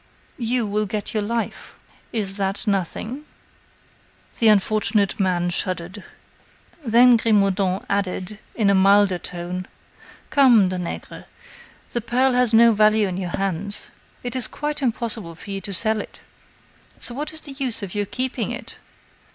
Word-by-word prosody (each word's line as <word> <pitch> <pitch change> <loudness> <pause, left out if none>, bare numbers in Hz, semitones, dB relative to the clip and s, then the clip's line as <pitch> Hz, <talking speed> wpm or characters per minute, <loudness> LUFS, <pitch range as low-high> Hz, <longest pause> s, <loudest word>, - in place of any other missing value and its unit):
"You 240 0 +1
will 210 +1 -1
get 210 0 -4
your 215 - 0
life. 230 +1 -4 0.4
Is 200 -3 -2
that 195 0 -2
nothing?" 210 - -2 1.2
The 230 - +4
unfortunate 210 0 +2
man 175 -2 +1
shuddered. 185 +2 -3 0.8
Then 240 0 +6
Grimaudan 195 -4 +1
added, 200 0 -2 0.2
in 205 -4 +3
a - - +4
milder 195 -1 +4
tone: 180 +1 -5 0.6
"Come, 240 -10 +5
Danègre, 180 -2 -6 0.7
that 240 -1 -4
pearl 255 +2 +2
has 250 -2 +4
no 230 0 +6
value 215 0 +4
in 185 -1 -4
your 180 -2 -3
hands. 195 +1 -3 0.3
It 245 +1 -4
is 255 -3 +1
quite 295 0 -4
impossible 225 -8 -2
for 200 - -9
you 195 0 -3
to 200 - -5
sell 215 +2 +1
it; - - -12 0.8
so 240 - -4
what 290 +4 -2
is 315 0 -3
the 285 - -8
use 250 -6 -1
of 190 - -6
your 205 -1 -1
keeping 255 +4 -2
it?" - - -8
210 Hz, 145 wpm, -22 LUFS, 190-235 Hz, 1.2 s, Then